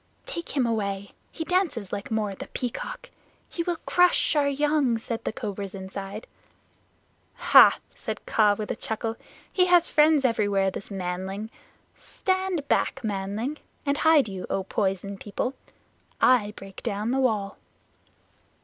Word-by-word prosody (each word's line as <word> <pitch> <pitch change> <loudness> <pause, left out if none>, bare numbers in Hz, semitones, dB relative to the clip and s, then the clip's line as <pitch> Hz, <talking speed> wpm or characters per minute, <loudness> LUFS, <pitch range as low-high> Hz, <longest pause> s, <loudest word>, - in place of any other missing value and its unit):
"Take 340 -11 -6
him 260 - +3
away. 200 -3 -2 0.2
He 325 - -4
dances 320 - 0
like 200 0 -4
Mao 215 -2 -1
the - - -8
Peacock. 255 - -5 0.4
He 340 - -4
will 350 0 -1
crush 355 -2 +4
our 290 -1 +3
young," 280 -3 +2
said 225 0 -5
the - - -1
cobras 205 -4 -5
inside. 195 +2 -7 1.1
"Hah!" - - +7 0.2
said - - -6
Kaa 210 -2 +3
with 215 - -3
a - - -2
chuckle, 225 +1 -3 0.4
"he 365 -1 +4
has 350 -1 +5
friends 300 -2 +4
everywhere, 205 -5 +2
this 195 - -6
manling. 190 +3 -4 0.4
Stand 375 -5 -2
back, 270 - +1
manling. 210 +7 -2 0.3
And 280 0 0
hide 315 -6 +5
you, 190 -2 -6
O 195 - -1
Poison 195 0 -2
People. 220 +5 -3 0.7
I 220 -5 +4
break 195 -1 -10
down 215 0 -2
the 265 - +1
wall." 215 -6 0
225 Hz, 140 wpm, -26 LUFS, 200-290 Hz, 1.1 s, Hah